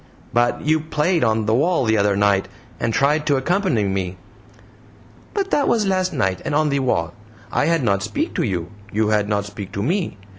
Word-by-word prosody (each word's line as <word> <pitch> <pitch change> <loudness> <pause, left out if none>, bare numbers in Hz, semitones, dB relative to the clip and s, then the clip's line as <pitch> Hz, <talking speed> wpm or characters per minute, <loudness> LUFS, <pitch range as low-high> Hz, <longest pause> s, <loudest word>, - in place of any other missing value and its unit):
"But 120 +1 +2
you 155 +1 +2
played 155 +2 0
on 110 -1 +1
the 110 - +1
wall 155 +3 +2
the 110 0 +2
other 100 -1 +2
night, 100 -1 +2 0.3
and 115 - 0
tried 150 +5 +1
to 145 - +3
accompany 165 - +1
me." 95 -2 -2 1.2
"But 395 -1 -1
that 285 - +2
was 220 -3 +2
lass 185 -1 +1
night 95 - -1
and - - -2
on 155 0 +2
the 140 0 +1
wall. 85 -11 0 0.4
I - - +1
had 165 -4 +2
not 100 -4 +1
speak 100 0 -2
to - - 0
you, 90 -5 -2 0.2
you 110 +1 +1
had 105 -1 +1
not 100 -1 0
speak 100 -1 -8
to 100 - -2
me. 170 - -1
115 Hz, 200 wpm, -21 LUFS, 100-155 Hz, 1.2 s, to